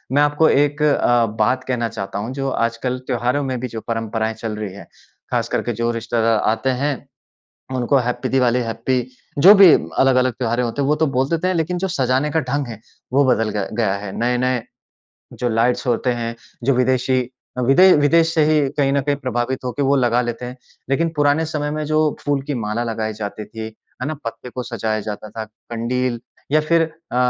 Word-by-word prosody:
मैं 145 - +5
आपको 145 +2 +3
एक 145 +1 +2
अ, 120 -5 +3
बात 125 +5 +2
कहना 120 -3 -1
चाहता 100 -2 -5
हूँ 115 +5 -4
जो 135 0 -2 0.2
आजकल 120 +2 -2
त्योहारों 125 +3 0
में 130 -2 -2
भी 130 - -3
जो 110 -2 -7
परंपराएँ 115 -1 -2
चल 110 -1 -5
रही 105 -3 -5
हैं, 100 - -11 0.4
खास - - 0
करके 120 - -1
जो 115 +1 -1
रिश्तेदार 115 -1 +1
आते 115 +4 -1
हैं, 145 -1 +1 0.8
उनको 130 +2 +2
हैप्पी 125 +1 -1
दिवाली, 125 -2 +2
हैप्पी, 120 +2 -1 0.3
जो 185 +8 +9
भी 195 -4 +9 0.3
अलग-अलग 130 -2 +3
त्योहारें 120 +1 -1
होते 120 +4 -2
हैं, 135 - 0
वो 150 - +3
तो 160 +1 +1
बोल 135 0 0
देते 170 +2 0
हैं, 185 - +1
लेकिन 165 +2 -1
जो 190 +2 -1
सजाने 135 -2 +1
का 160 - +2
ढंग 140 0 -2
है 115 -3 -8 0.3
वो 140 +1 +5
बदल 115 -4 +2
ग 100 - -1
गया 110 -5 +2
है। 100 -1 -6
नए-नए 125 0 +1 0.7
जो 120 - -2
लाइट्स 115 +3 +1
होते 120 +1 +1
हैं, 115 -1 -4 0.3
जो 135 +2 +3
विदेशी 130 +1 +2 0.4
अ, - - 0
विदे 135 +10 +6
विदेश 165 +3 +3
से 155 - +3
ही 155 - +4 0.2
कहीं 140 -2 +2
न 140 - +2
कहीं 145 +1 0
प्रभावित 130 -1 -2
होके 125 +3 -3
वो 140 +1 +3
लगा 120 -2 +2
लेते 120 0 -4
हैं। 125 +1 -8 0.3
लेकिन 165 +5 +1
पुराने 145 +2 +2
समय 150 -1 -3
में 155 0 -2
जो 155 +1 +1 0.3
फूल 145 -1 +1
की 145 - -1
माला 110 +3 -1
लगाई 110 -1 -3
जाती 105 0 -6
थी, 110 0 -7 0.4
है 125 - -2
ना? 155 - -2
पत्ते 115 +2 -6
को 125 +1 -5
सजाया 110 -2 -2
जाता 105 +1 -6
था, 110 +1 -5
कंडील 120 +2 -3 0.3
या 155 - +5
फिर 165 +2 +2 0.3
अ, - - -3
125 Hz, 205 wpm, -20 LUFS, 115-145 Hz, 0.8 s, जो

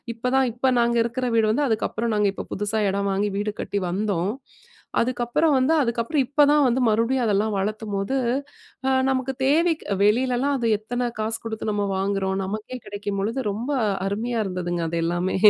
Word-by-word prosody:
இப்பதான் 250 +2 +1
இப்ப 245 +3 0
நாங்க 235 0 +2
இருக்கிற 250 +2 -2
வீடு 220 -1 +3
வந்து, 285 +6 +1
அதுக்கப்புறம் 225 +1 -1
நாங்க 210 -1 +3
இப்ப - - -7
புதுசாக 210 0 0
எடம் 200 +1 -1
வாங்கி 205 +2 0
வீடு 210 +1 -1
கட்டி 200 - -2
வந்தோம். 195 0 -1 0.7
அதுக்கப்புறம் 255 +6 +1
வந்து 260 +5 +3
அதுக்கப்புறம் 235 +4 0
இப்ப 290 +3 +2
தான் 295 0 +5
வந்து 250 +1 +1
மறுபடியும் 230 +4 +2
அதெல்லாம் 210 0 +1
வளர்க்கும்போது, 210 +3 -2 0.9
நமக்கு 265 0 0
தேவைக்கு, 320 +3 +2 0.2
வெளிலலாம் 250 +6 +2
அது 240 -3 -1
எத்தனை 245 +3 -3
காசு 220 +1 -1
குடுத்து 220 -1 -3
நம்ம 205 -1 0
வாங்குறோம். 195 0 0
நமக்கே 215 +6 -5
கிடைக்கும் 205 -1 -4
பொழுது 225 +6 -1
ரொம்ப 225 +7 -4 0.4
அருமையா 225 +4 -2
இருந்ததுங்க 175 -2 -2
அது 170 - -2
எல்லாமே 175 +2 0
220 Hz, 160 wpm, -24 LUFS, 200-255 Hz, 0.9 s, தான்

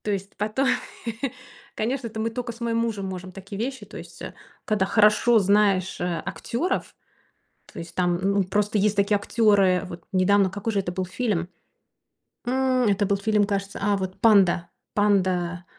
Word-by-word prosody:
То 210 - -1
есть 195 0 -4
по 210 +1 -1
той. 265 +5 +1 1.1
Конечно, 245 +3 -2
это 220 0 -7
мы 225 +1 -1
тока 240 0 -4
с 230 - -14
моим 230 -1 0
мужем 225 -4 -1
можем 185 -1 -6
такие 195 +2 -9
вещи. 265 +3 -4
То - - -11
есть, - - -11
а, - - -7 0.3
когда 210 -3 +1
хорошо 215 +3 +4
знаешь, 200 -2 +2
а, 175 -2 -1
актёров, 290 +11 -3 0.8
то - - -10
есть 165 - -8
там 180 -1 +1
Н 195 +2 0
ну, 200 -1 +2
просто 205 +3 0
есть 205 0 +2
такие 200 +1 +3
актёры 205 -3 +3
Вот 175 -2 -9
недавно, 190 +1 +3
какой 205 +4 -3
же 200 - +1
это 185 - -4
был 185 +1 -2
фильм? 185 -3 -2 1.0
М. 255 -1 +2
Это 205 0 +2
был 200 - +1
фильм, 210 +1 +2
кажется, 200 -1 -3
а, 205 0 +2
вот- 190 -1 -5
"Панда". 195 -6 +4 0.3
"Панда", 185 -4 +1
200 Hz, 180 wpm, -24 LUFS, 185-220 Hz, 1.1 s, хорошо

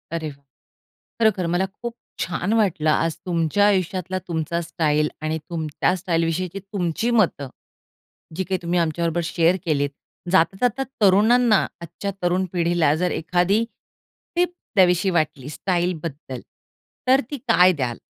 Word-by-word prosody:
अरे 160 -2 -3
वाह! 140 -1 -14 0.8
खरोखर 210 -6 +2
मला 185 +2 +2
खूप 230 +5 -7 0.3
छान 180 +4 -1
वाटलं, 185 -8 +2
आज 165 +1 +1
तुमच्या 170 +2 +2
आयुष्यातला 185 -1 0
तुमचा 170 0 -2
स्टाईल 150 -3 +1
आणि 155 +1 -1
तुमच्या 160 +1 -1
स्टाईल 170 -2 0
विषयीची 180 +3 -2
तुमची 195 +2 -2
मतं, 145 -7 -1 0.9
जी 190 - -1
काही 185 +1 -1
तुम्ही 175 +1 +1
आमच्या 170 0 0
बरोबर 170 +1 0
शेअर 170 +1 +2
केलीत. 145 -3 +1 0.4
जाता 185 0 +4
जाता 250 +2 +1 0.2
तरुणांना 215 +3 +5 0.2
आजच्या 170 +4 -5
तरुण 180 +2 +1
पिढीला 170 -3 +2
जर 180 - +1
एखादी 180 +6 +2 0.7
टिप 355 0 +1 0.2
द्यावीशी 185 0 +4
वाटली 145 -3 -3
स्टाईलबद्दल, 165 -7 -3 0.7
तर 265 +2 +5
ती 290 - -3
काय 185 -5 +6
द्याल? 125 -7 -2
175 Hz, 135 wpm, -22 LUFS, 160-195 Hz, 0.9 s, काय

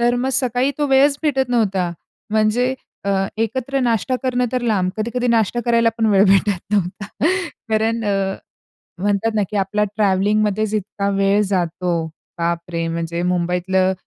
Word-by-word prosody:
तर 240 +1 +3
मग 250 +2 -1
सकाळी 255 0 +1
तो 295 - +1
वेळच 275 +1 +4
भेटत 270 -4 +1
नव्हता. 195 -7 +1 0.4
म्हणजे 220 +4 +2 0.3
अ, 200 - 0 0.3
एकत्र 260 +5 -1
नाष्टा 240 +1 +1
करणं 250 -1 +1
तर 255 - 0
लांब. 195 -6 +1
कधी-कधी 235 +3 -2
नाष्टा 230 +1 +2
करायला 235 -1 +3
पण 225 - +2
वेळ 200 0 +5
भेटत 195 -1 +3
नव्हता. 200 +1 -1 0.6
कारण 220 +1 0
अ, 195 -1 0 0.7
म्हणतात 205 +2 +1
ना 210 - +2
की 210 - -3
आपला 200 +2 +1
ट्रॅव्हलिंगमध्येच 210 +1 +1
इतका 200 -1 -2
वेळ 195 +1 +3
जातो, 175 -2 -1 0.3
बापरे! 170 0 -2
म्हणजे 170 +1 -3
मुंबईतल्या 180 +1 +1
210 Hz, 145 wpm, -20 LUFS, 190-235 Hz, 0.7 s, वेळ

